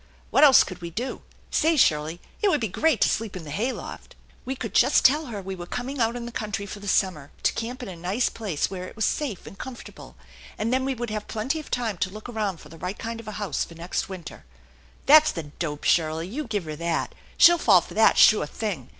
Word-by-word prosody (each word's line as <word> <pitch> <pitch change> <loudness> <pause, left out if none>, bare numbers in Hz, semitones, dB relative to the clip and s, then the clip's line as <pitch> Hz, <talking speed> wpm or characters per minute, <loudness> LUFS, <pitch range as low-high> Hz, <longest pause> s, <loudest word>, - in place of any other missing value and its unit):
" - - -30
What - - +5
else 275 -3 +8
could 180 -2 -9
we 170 - -5
do? 240 +10 -4 0.3
Say, 320 0 +2
Shirley, 155 - +2 0.2
it 415 - +4
would 305 - +2
be 225 - -1
great 275 - +1
to - - +6
sleep 220 -3 -2
in 180 - -6
the 150 - -8
hay 225 - 0
loft! - - -9
" - - -30
"We 265 +1 -3
could - - -6
just - - +4
tell 295 +3 +4
her 210 -5 -6
we 190 +1 -5
were 175 -2 -8
coming 260 +6 -4
out 230 +1 +1
in 240 -1 -5
the 240 - -6
country 210 -3 -4
for 205 +1 -8
the 205 - -9
summer 180 -7 0
to - - +3
camp 245 +3 -5
in - - -6
a 185 - -7
nice 185 +8 0
place 200 -10 -2
where 185 -1 -5
it - - -12
was 220 -3 0
safe 265 - -2
and 195 - -12
comfortable, 260 -2 -10 0.4
and 230 +3 -1
then 260 0 +1
we 270 -1 -1
would 240 -2 -4
have 215 -1 -4
plenty 250 +9 -2
of 305 - -10
time 225 -7 -2
to - - 0
look 215 +4 -9
around 210 -7 -3
for 150 - -14
the 165 +1 -13
right 180 +4 -4
kind 230 -1 -5
of 230 - -11
a 215 - -5
house 205 -1 -2
for 170 - -11
next 170 +4 -3
winter." 185 -4 -9 0.3
" - - -29
That's 310 +2 +7
the 165 - -5 0.2
dope, 150 -4 -3
Shirley! 160 0 +1
You 285 +10 -4
give 210 -4 -2
her 155 -1 -6
that. 170 0 -2 0.2
She'll 345 0 +7
fall 195 - +6
for - - -11
that, 220 - +4
sure 210 -8 +6
thing. 180 - -4
210 Hz, 260 wpm, -25 LUFS, 175-245 Hz, 0.4 s, else